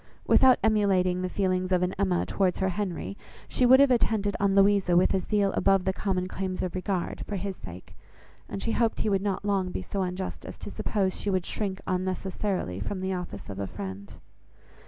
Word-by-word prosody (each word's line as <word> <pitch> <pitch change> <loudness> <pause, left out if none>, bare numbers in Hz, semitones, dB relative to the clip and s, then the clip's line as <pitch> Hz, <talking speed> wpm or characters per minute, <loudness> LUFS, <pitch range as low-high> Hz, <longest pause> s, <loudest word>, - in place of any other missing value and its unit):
Without 260 -1 +6
emulating 190 -4 +2
the 185 - -2
feelings 185 -1 0
of 180 -1 +3
an 180 +1 0
Emma 185 -2 0
towards 190 -2 0
her 190 - +1
Henry, 195 0 -3 0.3
she 250 - +2
would 260 +2 +8
have 280 -1 +6
attended 215 -4 +1
on 200 -1 +2
Louisa 195 -3 +4
with 180 - +4
a 190 - +2
zeal 200 +1 +1
above 195 -1 +3
the 190 - +1
common 185 -1 -1
claims 185 0 -3
of 180 -2 -3
regard, 185 -1 -2
for 205 - -3
his 195 0 -3
sake; 90 - -11 0.5
and 195 - -5
she 230 - -1
hoped 230 -1 +1
he 215 - +1
would 195 -2 +1
not 200 0 -2
long 195 -3 +1
be - - -4
so 200 - -3
unjust 185 0 -4
as - - -9
to - - -8
suppose 195 -3 -1
she 205 - -1
would 185 -3 0
shrink 195 -3 -3
unnecessarily 185 - -2
from 185 - -4
the 190 0 -2
office 175 - -6
of 100 -1 -7
a 100 - -2
friend. 100 +1 -7
190 Hz, 205 wpm, -27 LUFS, 180-200 Hz, 0.5 s, would